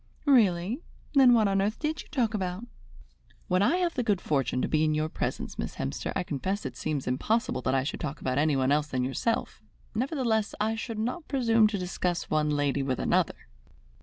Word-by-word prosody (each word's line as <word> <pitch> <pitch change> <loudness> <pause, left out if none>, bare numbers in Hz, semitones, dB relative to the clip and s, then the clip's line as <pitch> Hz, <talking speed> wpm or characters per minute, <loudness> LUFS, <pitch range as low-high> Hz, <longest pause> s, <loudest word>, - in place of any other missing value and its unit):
"Really? 220 - +3 0.3
Then 260 -4 +7
what 220 -3 +4
on 195 0 +2
earth 210 +3 0
did 310 0 -2
you - - -15
talk 240 -7 0
about?" 190 +1 -3 0.8
"When 185 +1 +2
I 275 - +3
have 350 -2 0
the 250 - -1
good 210 -6 +1
fortune 135 -6 0
to - - +1
be 155 0 +2
in 155 -1 +2
your 155 +1 0
presence, - - -4
Miss - - -4
Hemster, 70 0 -3
I - - 0
confess 185 +6 -3
it 130 -2 -5
seems 145 +1 -3
impossible 175 - 0
that 130 +2 0
I 130 - +2
should 140 - -4
talk 150 -2 -4
about 130 +1 -1
anyone 140 -3 +2
else 150 +1 +2
than 130 -3 -1
yourself, 135 - -2 0.3
nevertheless 230 -3 0
I 215 +1 +1
should 225 0 -5
not 250 +10 -3
presume 230 -5 +3
to 210 -1 -2
discuss 180 -1 -2
one 155 -1 +2
lady 145 -1 +1
with 130 -2 -1
another." - - +1
185 Hz, 200 wpm, -28 LUFS, 145-230 Hz, 0.8 s, Then